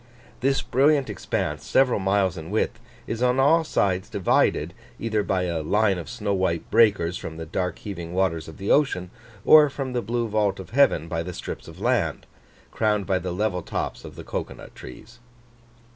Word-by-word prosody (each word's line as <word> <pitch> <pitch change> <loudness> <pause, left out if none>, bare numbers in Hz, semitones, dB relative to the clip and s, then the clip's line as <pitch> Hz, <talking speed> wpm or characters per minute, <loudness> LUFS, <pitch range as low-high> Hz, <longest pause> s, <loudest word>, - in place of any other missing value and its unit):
This 135 +1 +1
brilliant 140 +2 +2
expanse, - - -3
several 130 -5 +2
miles 95 -2 +1
in 80 0 -8
width, 110 +2 -1 0.3
is 115 +1 -4
on 125 +1 +2
all 160 +5 +4
sides 95 -10 0
divided, 100 -3 +1 0.3
either 110 -2 0
by 95 -2 0
a 85 -3 -2
line 100 +3 +1
of 85 - -8
snow 105 -4 -2
white 95 -3 -1
breakers 100 -7 +3
from 80 - -7
the 80 - -6
dark 90 +2 -3
heaving 85 -5 -7
waters 90 -3 0
of 80 - -11
the 100 - -2
ocean, 95 -12 +2 0.3
or 150 -1 +8
from 135 -2 -5
the 120 - 0
blue 115 +2 -2
vault 105 -2 0
of 95 - -9
heaven 125 - +3
by 80 -1 -2
the 90 +2 -6
strips - - -7
of - - -12
land, - - 0 0.5
crowned 105 -2 0
by 95 0 +1
the 90 0 -4
level 90 0 -1
tops - - -4
of - - -10
the - - -9
cocoa - - -5
nut - - -13
trees. 115 - -12
100 Hz, 190 wpm, -24 LUFS, 90-120 Hz, 0.5 s, or